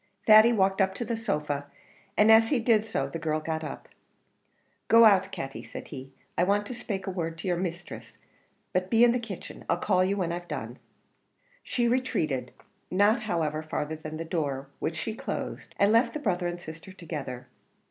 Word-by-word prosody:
Thady 215 +1 +8
walked 195 -3 +2
up 190 0 +1
to 240 - -3
the 230 +1 -2
sofa, 150 -10 -2 0.5
and 215 +1 +6
as 225 0 +7
he 280 - +2
did 225 -2 +3
so 215 -11 -2
the 165 +4 -6
girl 155 -1 -1
got 160 0 -3
up. 150 - -7 1.0
"Go 230 0 +7
out, 195 -3 +5
Katty," 135 0 -6
said - - -9
he, 135 -1 -8 0.2
"I 175 - +2
want 205 +2 +2
to 250 - -6
spake 200 -5 -4
a 190 - -3
word 165 -3 -3
to 165 - -6
your 180 - +2
misthress, 175 -1 -6 0.6
but 185 0 0
be 230 0 +5
in 240 - +7
the 245 - 0
kitchen; 220 -6 -8
I'll 170 - +2
call 185 0 +2
you 195 +2 0
when 175 -4 -1
I've 175 0 -5
done." - - -6 0.8
She 240 -2 0
retreated, 155 - 0 0.4
not, 205 +5 +3
however, 165 -8 -1
farther 155 0 -3
than 155 0 -7
the 165 - -5
door, 140 -5 -2
which 160 - -2
she 220 +7 -3
closed, - - -5
and 200 +1 +4
left 230 +4 +3
the - - -2
brother 180 -9 0
and 175 0 -4
sister 165 +2 -10
together. 145 -9 -7
185 Hz, 195 wpm, -28 LUFS, 160-215 Hz, 1.0 s, Thady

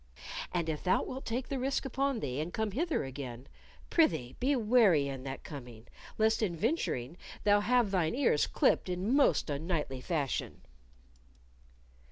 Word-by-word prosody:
And 170 -2 -1
if 155 -2 -3
thou 185 - +2
wilt 265 +1 -6
take 245 +3 -2
the 275 - -2
risk 270 +2 -1
upon 270 -1 -1
thee 130 -1 -3
and 160 +3 -3
come 220 +2 -1
hither 315 - 0
again, 130 -2 -7 0.5
prithee 160 - +2
be 275 +3 +2
wary 215 - +4
in 135 -2 -5
that 135 0 -6
coming, 120 -6 -10 0.3
lest 220 +1 +2
in 190 -6 0
venturing 170 - -1 0.3
thou 205 0 +5
have 235 0 +2
thine 180 -1 +1
ears 250 - +2
clipped - - +2
in 185 +6 -1
most 285 - +3
unknightly 145 -3 -2
fashion." 145 -2 -2
180 Hz, 155 wpm, -31 LUFS, -, 0.5 s, thou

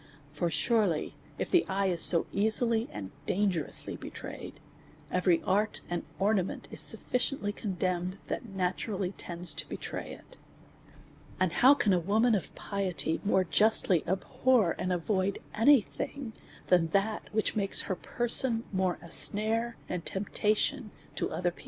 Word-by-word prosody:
For 160 +3 -1
sure 225 +3 +2
ly, 160 -4 -2 0.3
if - - -3
the 355 - +5
eye 195 +1 0
is 175 -3 0
so 170 -2 +6
easily 220 +2 +1
and 95 -2 -7 0.2
dangerously 185 -5 0
betrayed, - - -8 0.5
every 180 -2 +2
art 205 +3 0
and 175 - -1 0.2
ornament 195 -2 0
is - - -7
sufficiently 250 -4 -1
condemned, 185 -2 -2
that 240 - -4
naturally 190 0 -2
tends 175 -2 -2
to - - -5
betray - - -5
it. - - -15 1.0
And 185 -3 +1
how 265 +7 +6
can 205 -8 +2
a 180 - +3
woman 220 +7 +2
of 200 - -1
piety 180 -6 -1
more 190 -2 +3
justly 195 -2 +3
abhor 200 +2 +2
and 185 - -1
avoid 190 +2 0 0.2
any 255 +4 +6
thing, 250 +3 -6 0.3
than 175 -2 +3
that 200 +5 -1
which 220 0 0
makes 200 -2 -1
her 185 - -3
per 240 +6 -3
son 230 -1 +4
more 185 -2 0
a 170 - -11
snare 225 +3 +2
and 180 -2 -4
temptation 210 +6 -1 0.2
to - - -2
other 175 -1 -1
people - - -20
195 Hz, 150 wpm, -30 LUFS, 180-220 Hz, 1.0 s, so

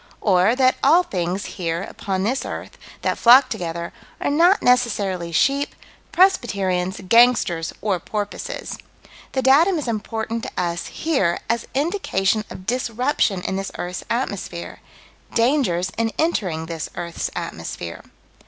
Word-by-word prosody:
Or 195 +3 +3
that 255 0 +3
all 330 +6 +6
things, 185 - -2
here, 170 0 -3
upon 190 -1 -3
this 255 +6 0
earth, - - -7 0.3
that - - 0
flock 255 +3 +7
together, 170 0 -4 0.3
are - - 0
not 345 +7 +4
necessarily 205 -8 +1
sheep, 275 - +1 0.4
Presbyterians, 195 - +2
gangsters, 230 -8 +4
or 200 -4 +1
porpoises. 205 +3 -5 0.5
The 265 - 0
datum 320 +8 +5
is 295 - -4
important 225 0 -3
to - - -6
us, 175 -1 -2
here, 265 - 0
as 230 0 -1
indication 265 - 0
of 185 - -10
disruption 245 -3 0
in 190 - -2
this 195 0 -4
earth's 180 0 -4
atmosphere 200 -7 -3 0.6
dangers 230 - +2
in 225 -1 +1
entering 185 - 0
this 165 -1 -5
earth's 170 -1 -4
atmosphere. 85 -1 -6
215 Hz, 130 wpm, -22 LUFS, 180-260 Hz, 0.6 s, flock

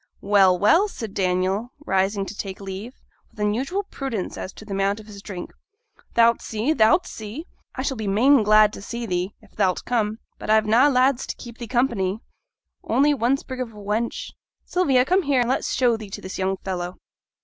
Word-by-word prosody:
'Well, 195 -2 +4
well!' 215 - +4
said 225 - -7
Daniel, 190 +5 0
rising 195 +1 +1
to - - -7
take 195 -2 -6
leave, 195 +5 -7 0.3
with - - -20
unusual 255 - 0
prudence 265 - -4
as 185 - -6
to 215 - -12
the 205 - -10
amount 195 +2 0
of 215 - -12
his 205 -2 -11
drink. 190 -4 -7 0.6
'Thou'lt 235 0 +5
see, 225 +8 -1
thou'lt 240 +8 +4
see! 220 +9 -7 0.3
I 260 - -3
shall 270 -2 -2
be 215 -2 -4
main 245 +7 +5
glad 215 0 +5
to - - -8
see 235 +3 -5
thee; 180 0 -2
if 215 - -21
thou'lt 190 -3 +1
come. 220 -3 0 0.2
But - - -7
I've 220 0 +4
na' 230 +6 +5
lads 260 -1 +2
to - - -4
keep 235 -1 -11
thee 235 - -6
company, 225 -6 0 0.6
only 290 +2 +3
one 260 +1 +2
sprig 260 -2 -7
of 235 -3 -5
a - - -16
wench. 215 - -3 0.3
Sylvia, 275 -9 +2
come 370 +5 +3
here, 280 -6 +2
an 240 - 0
let's 260 - 0
show 245 -3 +3
thee 215 -2 -9
to - - -7
this 185 - -7
young 190 0 0
fellow!' 180 -2 -4
220 Hz, 200 wpm, -23 LUFS, 195-255 Hz, 0.6 s, Thou'lt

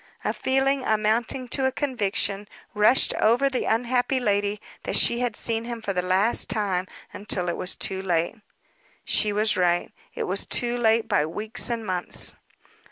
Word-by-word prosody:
A - - 0
feeling, 270 +1 +1
amounting 220 +4 0
to 265 +1 +1
a - - 0
conviction, 215 -7 -1 0.3
rushed 215 +4 +4
over 245 +5 +3
the 255 - -2
unhappy 245 +3 +1
lady 205 -2 0 0.2
that - - -3
she 235 - +3
had 245 -3 -1
seen 230 +1 0
him 235 -1 -5
for 205 -3 -3
the 180 - 0
last 190 +5 +2
time 190 -4 -1 0.3
until 195 -3 -2
it 170 - -2
was 185 - -3
too 190 0 -1
late. 170 -3 0 0.7
She 210 - +2
was 210 +1 +1
right. 175 -2 +1 0.2
It - - -2
was 190 +2 -2
too 240 0 +1
late 225 -1 +2
by 150 - +1
weeks 215 +9 -2
and 230 -2 -3
months. 180 -3 +1
215 Hz, 165 wpm, -24 LUFS, 195-245 Hz, 0.7 s, rushed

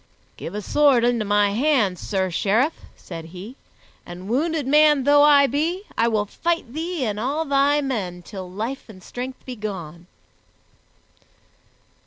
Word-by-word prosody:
"Give 175 - -7
a 210 - -4
sword 280 -3 +3
into 240 -2 +1
my 205 0 +2
hand, 225 - +1
Sir 190 -2 -2
Sheriff," 225 - +1 0.2
said 165 -3 -9
he, 185 +9 -10 0.5
"and 180 +2 -10
wounded 300 +5 0
man 295 0 +4
though 290 +1 +5
I 290 -1 +6
be, 320 - -1
I 230 - +2
will 215 -3 +1
fight 330 +1 -2
thee 325 -2 -3
and 210 -2 -2
all 285 +7 -1
thy 285 +1 +2
men 195 -10 -3
till 190 -2 -8
life 225 +8 -5
and 185 -4 -13
strength 255 +5 -7
be 255 - -6
gone." 180 -6 -7
240 Hz, 150 wpm, -22 LUFS, 200-290 Hz, 0.5 s, I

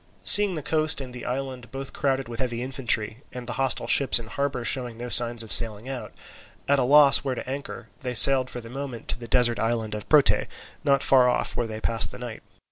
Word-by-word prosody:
Seeing 205 -3 +7
the 155 - -6
coast 155 +1 0
and 130 -2 -9
the 125 - -9
island 125 -2 -6
both 135 0 -7
crowded 135 -3 -2
with 115 -1 -9
heavy 120 -2 -4
infantry, 120 -4 -2
and 125 -1 -9
the 120 - -6
hostile 135 -2 -1
ships 140 - +3
in 120 - -7
harbour 135 +1 -4
showing 125 -4 -1
no 120 +1 -7
signs 120 -1 +4
of 110 - -11
sailing 115 0 -1
out, 135 -2 -7 0.6
at 140 0 +2
a - - +1
loss 140 +2 +5
where 135 -2 -4
to - - -8
anchor, 140 +2 -8
they 125 -2 -5
sailed 130 +2 +7
for 125 - -8
the 115 - -12
moment 135 -3 -8
to - - -2
the 120 - -10
desert 120 0 +1
island 115 -1 -3
of 105 -1 -8
Prote, 150 -3 +3 0.4
not 140 -1 +1
far 130 -2 +3
off, 125 - -3
where 120 - -3
they 110 -1 -7
passed 115 0 0
the - - -11
night. 120 -2 -9
125 Hz, 225 wpm, -24 LUFS, 120-135 Hz, 0.6 s, Seeing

